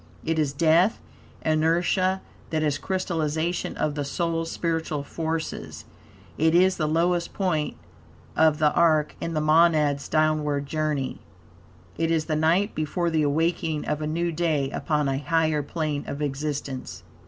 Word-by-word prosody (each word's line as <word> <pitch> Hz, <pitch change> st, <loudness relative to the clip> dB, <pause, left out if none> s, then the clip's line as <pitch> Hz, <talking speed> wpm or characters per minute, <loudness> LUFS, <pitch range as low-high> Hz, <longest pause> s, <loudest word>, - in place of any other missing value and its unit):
It 160 Hz, 0 st, 0 dB
is 150 Hz, -3 st, +1 dB
death, 165 Hz, +7 st, +3 dB, 0.5 s
inertia; 175 Hz, +4 st, +2 dB, 0.3 s
that 155 Hz, -1 st, 0 dB
is, 145 Hz, -1 st, 0 dB
crystallization 170 Hz, -2 st, -2 dB
of 150 Hz, -, 0 dB
the 145 Hz, 0 st, -2 dB
soul's 165 Hz, +3 st, -2 dB
spiritual 160 Hz, -3 st, -2 dB
forces. 160 Hz, +2 st, -4 dB, 0.5 s
It 160 Hz, +2 st, +3 dB
is 185 Hz, +1 st, +4 dB
the 155 Hz, -, 0 dB
lowest 170 Hz, +2 st, 0 dB
point 170 Hz, -, -1 dB, 0.6 s
of 160 Hz, -1 st, +4 dB
the 150 Hz, -1 st, +3 dB
are 155 Hz, -3 st, +4 dB, 0.2 s
in 165 Hz, -1 st, -3 dB
the 155 Hz, -, +1 dB
monad's 155 Hz, -2 st, +3 dB
downward 155 Hz, -2 st, +1 dB
journey. 150 Hz, -3 st, -2 dB, 0.8 s
It 165 Hz, 0 st, +1 dB
is 160 Hz, -2 st, +1 dB
the 155 Hz, -, -1 dB
night, 170 Hz, +7 st, +2 dB
before 165 Hz, +3 st, -1 dB
the 160 Hz, -1 st, +2 dB
awakening 160 Hz, +1 st, 0 dB
of 150 Hz, -, -2 dB
a 150 Hz, -, -2 dB
new 170 Hz, +2 st, -1 dB
day 155 Hz, -4 st, 0 dB
upon 150 Hz, -2 st, 0 dB
a 135 Hz, 0 st, 0 dB
higher 155 Hz, +1 st, +1 dB
plane 150 Hz, -1 st, -3 dB
of 140 Hz, -, -5 dB
existence. 140 Hz, -, -4 dB
155 Hz, 145 wpm, -25 LUFS, 150-165 Hz, 0.8 s, is